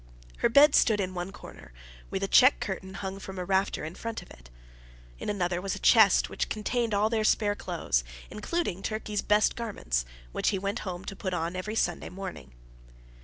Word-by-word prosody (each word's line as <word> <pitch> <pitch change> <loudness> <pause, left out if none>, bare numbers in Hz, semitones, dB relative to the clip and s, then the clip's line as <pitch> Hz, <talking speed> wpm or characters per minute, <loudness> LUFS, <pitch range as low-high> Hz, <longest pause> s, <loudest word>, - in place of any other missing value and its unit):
Her - - +2
bed 285 +4 +7
stood 215 -3 +4
in 185 -2 -2
one 180 +1 -4
corner, 205 - -12 0.4
with - - -3
a - - +1
check - - +6
curtain 190 0 -5
hung 195 0 -5
from 190 -1 -8
a 180 - -3
rafter 190 -3 0
in 160 - -6
front 230 +4 -5
of - - -18
it. - - -15 0.7
In - - -4
another 180 -3 -1
was 195 0 -2
a - - -7
chest, 220 -5 +6
which - - -3
contained 225 +1 -1
all 205 +2 +3
their 220 -1 0
spare 210 -1 +2
clothes, 170 - -1 0.3
including 210 - -2
Turkey's 215 -1 -2
best 210 +1 +3
garments, 130 - -2 0.3
which - - 0
he 200 - 0
went 200 +4 -2
home 180 +1 -6
to 195 - -6
put 185 -1 -3
on 170 +1 -2
every 210 +4 -4
Sunday 175 -6 -1
morning. 185 - -8
195 Hz, 195 wpm, -28 LUFS, 180-215 Hz, 0.7 s, bed